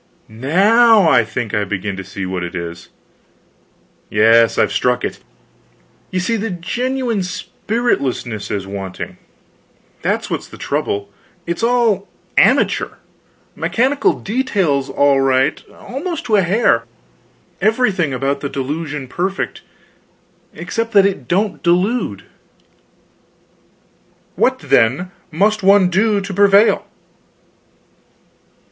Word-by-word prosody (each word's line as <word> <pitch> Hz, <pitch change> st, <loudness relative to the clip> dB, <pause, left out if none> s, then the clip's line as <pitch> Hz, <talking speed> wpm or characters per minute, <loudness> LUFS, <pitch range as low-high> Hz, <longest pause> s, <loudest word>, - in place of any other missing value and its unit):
Now 195 Hz, -, +4 dB
I 120 Hz, -, +5 dB
think 110 Hz, 0 st, -5 dB
I 105 Hz, -, +1 dB
begin 100 Hz, 0 st, -3 dB
to 95 Hz, -, -6 dB
see 95 Hz, +1 st, -6 dB
what 90 Hz, -1 st, -3 dB
it 85 Hz, +1 st, -6 dB
is. 85 Hz, -1 st, -6 dB, 1.2 s
Yes, 115 Hz, +2 st, +4 dB
I've -, -, +2 dB
struck 125 Hz, 0 st, +1 dB
it. -, -, -5 dB, 0.9 s
You 185 Hz, -, -2 dB
see, 225 Hz, +6 st, 0 dB
the 225 Hz, +2 st, -3 dB
genuine 240 Hz, +6 st, -2 dB
spiritlessness 180 Hz, -, -2 dB
is 100 Hz, -2 st, -3 dB
wanting; 95 Hz, -1 st, -7 dB, 0.8 s
that's -, -, -1 dB
what's -, -, -4 dB
the -, -, -13 dB
trouble. 100 Hz, 0 st, -3 dB, 0.3 s
It's 170 Hz, +3 st, -3 dB
all 230 Hz, -4 st, +2 dB, 0.3 s
amateur -, -, +3 dB, 0.6 s
mechanical 270 Hz, +4 st, +1 dB
details 195 Hz, -, 0 dB
all 140 Hz, 0 st, +3 dB
right, 135 Hz, +2 st, +1 dB
almost 330 Hz, +7 st, -6 dB
to 220 Hz, -, +2 dB
a 200 Hz, -, +5 dB
hair; 175 Hz, -, +2 dB, 0.8 s
everything 205 Hz, -, +1 dB
about 135 Hz, +2 st, -1 dB
the 140 Hz, -, -4 dB
delusion 145 Hz, +1 st, -4 dB
perfect, 185 Hz, +8 st, -3 dB, 0.9 s
except 230 Hz, 0 st, -4 dB
that 200 Hz, -1 st, +6 dB
it 200 Hz, -1 st, -2 dB
don't 200 Hz, +4 st, 0 dB
delude." 180 Hz, -, 0 dB, 2.1 s
"What, -, -, +2 dB
then, 140 Hz, +12 st, +1 dB, 0.2 s
must 210 Hz, +6 st, +1 dB
one 195 Hz, -1 st, +5 dB
do, 205 Hz, +3 st, +2 dB
to 195 Hz, 0 st, -6 dB
prevail?" 200 Hz, +2 st, +4 dB
175 Hz, 110 wpm, -18 LUFS, -, 2.1 s, that